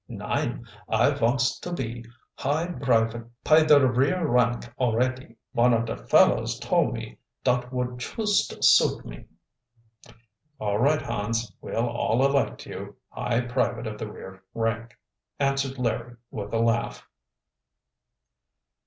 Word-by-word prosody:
"Nein, -, -, -3 dB, 0.2 s
I -, -, +3 dB
vonts 125 Hz, +3 st, +1 dB
to 175 Hz, -, -6 dB
be 120 Hz, -7 st, -4 dB, 0.3 s
high 150 Hz, +5 st, -1 dB
brivate 115 Hz, -8 st, 0 dB, 0.2 s
py 155 Hz, +1 st, +6 dB
der 150 Hz, -3 st, +6 dB
rear 135 Hz, +8 st, +2 dB
rank 120 Hz, -2 st, +2 dB, 0.2 s
alretty. 125 Hz, 0 st, 0 dB, 0.2 s
Von 120 Hz, -1 st, +4 dB
of 115 Hz, 0 st, 0 dB
der 115 Hz, -, -4 dB
fellows -, -, +4 dB
tole -, -, +1 dB
me -, -, -7 dB, 0.2 s
dot 125 Hz, 0 st, +1 dB
would 125 Hz, -1 st, -3 dB
chust 210 Hz, -, -1 dB
suit -, -, +5 dB
me." -, -, -10 dB, 1.3 s
"All 105 Hz, -1 st, -1 dB
right, 145 Hz, +5 st, +3 dB
Hans, 115 Hz, +1 st, -2 dB
we'll 115 Hz, +1 st, -1 dB
all 120 Hz, +2 st, +1 dB
elect 140 Hz, 0 st, 0 dB
you -, -, -8 dB
high 115 Hz, -, -1 dB
private 120 Hz, -1 st, -1 dB
of 105 Hz, -1 st, -6 dB
the 110 Hz, -, -5 dB
rear 95 Hz, -1 st, -11 dB
rank," 115 Hz, 0 st, -2 dB, 0.4 s
answered 135 Hz, -1 st, 0 dB
Larry 120 Hz, 0 st, -2 dB, 0.2 s
with 105 Hz, -1 st, -6 dB
a 115 Hz, -, 0 dB
laugh. 115 Hz, 0 st, 0 dB
120 Hz, 130 wpm, -26 LUFS, 115-135 Hz, 1.3 s, py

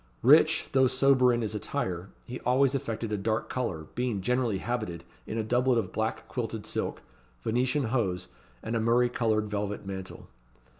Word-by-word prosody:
Rich, -, -, +5 dB
though 130 Hz, -1 st, +5 dB
sober 130 Hz, 0 st, +4 dB
in 120 Hz, -1 st, 0 dB
his 110 Hz, -, -2 dB
attire, 95 Hz, -5 st, -3 dB, 0.2 s
he 125 Hz, -, -6 dB
always 130 Hz, +2 st, +3 dB
affected 115 Hz, -4 st, -3 dB
a 105 Hz, -, 0 dB
dark 110 Hz, +2 st, -1 dB
colour, 90 Hz, -12 st, -2 dB
being 120 Hz, -5 st, -1 dB
generally 125 Hz, 0 st, +1 dB
habited 100 Hz, -6 st, -3 dB, 0.2 s
in 110 Hz, -, -3 dB
a 110 Hz, -, 0 dB
doublet 125 Hz, +2 st, +2 dB
of 115 Hz, -, -1 dB
black 110 Hz, 0 st, -2 dB
quilted -, -, -4 dB
silk, -, -, -2 dB, 0.4 s
Venetian 130 Hz, +5 st, +1 dB
hose, 110 Hz, -7 st, -1 dB, 0.4 s
and 115 Hz, -, -2 dB
a -, -, +2 dB
murrey 120 Hz, +2 st, +3 dB
coloured 110 Hz, -3 st, +1 dB
velvet 105 Hz, -1 st, -3 dB
mantle. 95 Hz, -1 st, -7 dB
115 Hz, 165 wpm, -28 LUFS, 105-125 Hz, 0.4 s, Rich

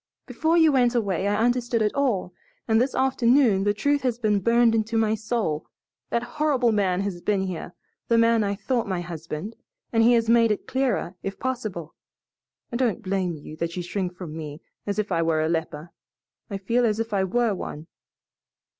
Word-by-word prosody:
Before 315 Hz, +7 st, +1 dB
you 320 Hz, -2 st, +6 dB
went 250 Hz, -3 st, +3 dB
away 200 Hz, -4 st, 0 dB
I 205 Hz, -, +1 dB
understood 240 Hz, -1 st, +1 dB
it 210 Hz, -, 0 dB
all, 230 Hz, -10 st, 0 dB, 0.3 s
and 220 Hz, 0 st, +3 dB
this 260 Hz, +2 st, 0 dB
afternoon 250 Hz, -5 st, +3 dB
the 205 Hz, -, +3 dB
truth 285 Hz, +6 st, +1 dB
has 250 Hz, -3 st, 0 dB
been 215 Hz, -4 st, +1 dB
burned 230 Hz, +3 st, +3 dB
into 225 Hz, +1 st, 0 dB
my 220 Hz, -1 st, +2 dB
soul. 215 Hz, -8 st, -2 dB, 0.4 s
That 235 Hz, -, 0 dB, 0.2 s
horrible 265 Hz, -6 st, +3 dB
man 195 Hz, -3 st, +1 dB
has 195 Hz, -3 st, -4 dB
been 200 Hz, 0 st, 0 dB
here 180 Hz, -2 st, -5 dB, 0.3 s
the 230 Hz, -, +3 dB
man 230 Hz, -1 st, +4 dB
I 200 Hz, 0 st, -1 dB
thought 235 Hz, +2 st, -1 dB
my 185 Hz, -3 st, -2 dB
husband 170 Hz, +4 st, -6 dB, 0.4 s
and 225 Hz, -, +4 dB
he 235 Hz, +2 st, +6 dB
has 230 Hz, -1 st, +2 dB
made 230 Hz, 0 st, +5 dB
it 210 Hz, -, -1 dB
clearer, 260 Hz, -9 st, -1 dB
if 195 Hz, -, -5 dB
possible. 215 Hz, -11 st, -4 dB, 0.8 s
I 235 Hz, -, -2 dB
don't 240 Hz, -5 st, 0 dB
blame 185 Hz, -3 st, -1 dB
you 150 Hz, +1 st, -10 dB
that 170 Hz, +2 st, -3 dB
you 180 Hz, -, -2 dB
shrink 180 Hz, 0 st, -3 dB
from 175 Hz, -4 st, -8 dB
me 150 Hz, -1 st, -7 dB, 0.3 s
as 205 Hz, -, -2 dB
if 215 Hz, -1 st, -2 dB
I 165 Hz, -, +2 dB
were 160 Hz, -1 st, +1 dB
a -, -, +1 dB
leper. 160 Hz, 0 st, -3 dB, 0.6 s
I 200 Hz, -, -3 dB
feel 230 Hz, +6 st, 0 dB
as 220 Hz, -2 st, +1 dB
if 225 Hz, -1 st, -3 dB
I 195 Hz, -1 st, +2 dB
were 230 Hz, +3 st, +1 dB
one." 155 Hz, -4 st, -6 dB
215 Hz, 195 wpm, -25 LUFS, 185-240 Hz, 0.8 s, you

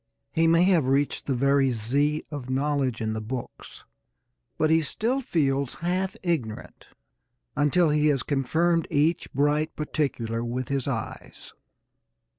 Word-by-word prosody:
He 165 Hz, 0 st, +2 dB
may 165 Hz, +1 st, +5 dB
have 175 Hz, -7 st, +3 dB
reached 140 Hz, +2 st, 0 dB
the 135 Hz, -, +1 dB
very 140 Hz, +1 st, +3 dB
Z 140 Hz, +7 st, 0 dB
of 140 Hz, -4 st, -6 dB
knowledge 135 Hz, -2 st, 0 dB
in 110 Hz, 0 st, -1 dB
the 110 Hz, -, -3 dB
books, 120 Hz, +3 st, -7 dB, 0.7 s
but 155 Hz, 0 st, +2 dB
he 160 Hz, 0 st, +4 dB
still 235 Hz, -, -1 dB
feels 140 Hz, -, 0 dB
half 185 Hz, +2 st, -2 dB
ignorant 145 Hz, -12 st, -3 dB, 0.7 s
until 155 Hz, +3 st, +3 dB
he 150 Hz, 0 st, +3 dB
has 140 Hz, -4 st, +2 dB
confirmed 160 Hz, +5 st, +1 dB
each 160 Hz, +4 st, +1 dB
bright 145 Hz, +3 st, +1 dB
particular 125 Hz, -7 st, -2 dB
with 120 Hz, +2 st, -3 dB
his 140 Hz, -1 st, -1 dB
eyes. 115 Hz, -6 st, -6 dB
145 Hz, 135 wpm, -26 LUFS, 130-160 Hz, 0.7 s, may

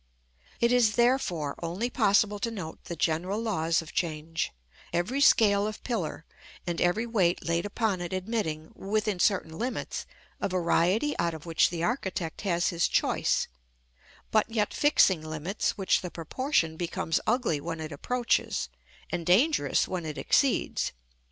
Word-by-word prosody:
It 235 Hz, 0 st, +3 dB
is, 235 Hz, -4 st, +4 dB
therefore, 235 Hz, -, +1 dB
only 180 Hz, +9 st, -2 dB
possible 205 Hz, -2 st, +3 dB
to 230 Hz, -, -1 dB
note 185 Hz, -8 st, -7 dB
the 170 Hz, -, -5 dB
general 170 Hz, +6 st, 0 dB
laws 170 Hz, -8 st, 0 dB
of 160 Hz, -, -12 dB
change; 165 Hz, -1 st, -2 dB, 0.4 s
every 180 Hz, +12 st, 0 dB
scale 205 Hz, -6 st, +5 dB
of 215 Hz, -, -7 dB
pillar, 185 Hz, -9 st, -3 dB, 0.4 s
and 170 Hz, -1 st, -2 dB
every 175 Hz, +7 st, +2 dB
weight 190 Hz, -7 st, +1 dB
laid 170 Hz, +3 st, 0 dB
upon 205 Hz, -3 st, -1 dB
it 175 Hz, -, -4 dB
admitting, 185 Hz, -5 st, -3 dB
within 210 Hz, -1 st, -1 dB
certain 180 Hz, -5 st, +1 dB
limits, 250 Hz, +2 st, -3 dB, 0.3 s
a -, -, -1 dB
variety 185 Hz, -, +2 dB
out 170 Hz, -1 st, 0 dB
of 155 Hz, -, -10 dB
which 165 Hz, -1 st, +3 dB
the 170 Hz, -1 st, -4 dB
architect 190 Hz, -7 st, -2 dB
has 175 Hz, -3 st, +1 dB
his 170 Hz, -1 st, +1 dB
choice; -, -, +1 dB, 0.8 s
but 215 Hz, +1 st, +3 dB
yet 215 Hz, -2 st, 0 dB
fixing 195 Hz, -, +4 dB
limits 155 Hz, +8 st, -2 dB
which 195 Hz, -2 st, +2 dB
the 180 Hz, -, -5 dB
proportion 165 Hz, -, -1 dB
becomes 165 Hz, -1 st, -1 dB
ugly 225 Hz, -, +1 dB
when 165 Hz, +1 st, -4 dB
it 160 Hz, 0 st, -5 dB
approaches, 240 Hz, -, 0 dB, 0.4 s
and 175 Hz, -1 st, -2 dB
dangerous 195 Hz, -, +3 dB
when 180 Hz, -2 st, -3 dB
it 150 Hz, -, -5 dB
exceeds. 275 Hz, -3 st, +1 dB
185 Hz, 150 wpm, -28 LUFS, 165-220 Hz, 0.8 s, scale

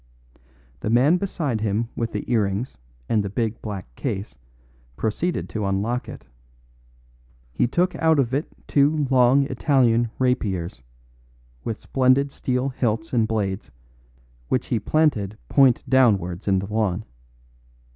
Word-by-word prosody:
The -, -, -3 dB
man 130 Hz, +9 st, +4 dB
beside 155 Hz, -, -2 dB
him 110 Hz, +2 st, -1 dB
with 115 Hz, -1 st, -2 dB
the 105 Hz, -, -3 dB
earrings 105 Hz, +1 st, 0 dB, 0.3 s
and 110 Hz, -, +2 dB
the 100 Hz, -, -3 dB
big 110 Hz, +2 st, -2 dB
black 95 Hz, -, -7 dB
case 95 Hz, -, -4 dB, 0.6 s
proceeded 165 Hz, +11 st, -1 dB
to 105 Hz, -2 st, -2 dB
unlock 105 Hz, +6 st, -1 dB
it. -, -, -10 dB, 1.3 s
He 90 Hz, -, +1 dB
took 180 Hz, +8 st, +1 dB
out 160 Hz, -1 st, +3 dB
of 130 Hz, -3 st, +1 dB
it 145 Hz, +4 st, 0 dB, 0.2 s
two 145 Hz, +1 st, +3 dB
long 130 Hz, +2 st, +5 dB
Italian 125 Hz, -5 st, +2 dB
rapiers, 100 Hz, -, -1 dB, 0.8 s
with 115 Hz, -, -4 dB
splendid 135 Hz, +2 st, +2 dB
steel 130 Hz, 0 st, -1 dB
hilts 115 Hz, -4 st, -2 dB
and 115 Hz, -3 st, +2 dB
blades, 100 Hz, -7 st, -2 dB, 0.8 s
which 130 Hz, -, 0 dB
he 115 Hz, -, 0 dB
planted 110 Hz, -6 st, +1 dB
point 135 Hz, -4 st, +4 dB
downwards 100 Hz, -9 st, +2 dB
in 95 Hz, -1 st, +3 dB
the 95 Hz, -, -2 dB
lawn. 110 Hz, -2 st, 0 dB
115 Hz, 130 wpm, -23 LUFS, 105-135 Hz, 1.3 s, long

